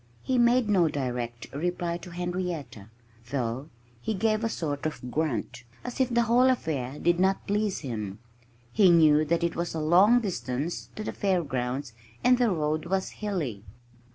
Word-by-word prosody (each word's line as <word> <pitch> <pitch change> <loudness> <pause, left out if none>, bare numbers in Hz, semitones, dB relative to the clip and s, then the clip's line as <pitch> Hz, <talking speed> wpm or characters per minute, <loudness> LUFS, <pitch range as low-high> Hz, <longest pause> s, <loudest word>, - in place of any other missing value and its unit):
He 255 -1 +1
made 240 0 +4
no 185 -5 +4
direct 120 -5 -3
reply 170 +3 -2
to 180 - -10
Henrietta, 175 - -4 0.4
though 130 +2 -2 0.3
he 220 - -2
gave 215 +2 +1
a 225 - +1
sort 145 -6 -2
of 125 -5 -7
grunt, 125 -5 -2 0.2
as 250 +1 -6
if 260 -1 +3
the 235 0 +3
whole 245 +3 +4
affair 145 - -1
did 175 +2 +2
not 190 +1 +2
please 205 -1 0
him. 105 -8 -4 0.6
He 195 +4 +6
knew 155 -3 +6
that 170 +2 +1
it 170 -1 0
was 170 -1 -3
a - - -1
long 185 +10 +5
distance 165 - -3
to 215 - -5
the - - -4
fairgrounds 135 - -1 0.3
and 250 0 +5
the 245 -2 +3
road 155 -2 -1
was 190 +1 0
hilly. 170 - -3
170 Hz, 165 wpm, -27 LUFS, 135-205 Hz, 0.6 s, He